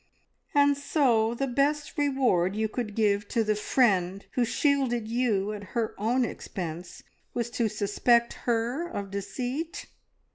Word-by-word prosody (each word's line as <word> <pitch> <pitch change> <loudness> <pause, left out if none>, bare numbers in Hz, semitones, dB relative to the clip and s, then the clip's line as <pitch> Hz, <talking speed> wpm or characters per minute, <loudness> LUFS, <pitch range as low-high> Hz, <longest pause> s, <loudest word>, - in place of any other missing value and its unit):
"And 285 0 +5
so 245 -6 +2
the 275 - -1
best 280 +3 0
reward 255 -11 +2
you 220 0 0
could 215 -2 -4
give 210 -2 +1
to 230 0 +1
the 215 0 +1
friend 200 -4 +1
who 250 - +1
shielded 245 -3 +1
you 220 -4 0
at 205 -1 -7
her 230 -2 0
own 240 +4 +2
expense 175 -5 -6 0.3
was 235 -1 -2
to 235 -2 0
suspect 220 +3 +2 0.2
her 240 +8 0
of 200 - -5
deceit! 245 - -4
235 Hz, 140 wpm, -27 LUFS, 205-260 Hz, 0.3 s, And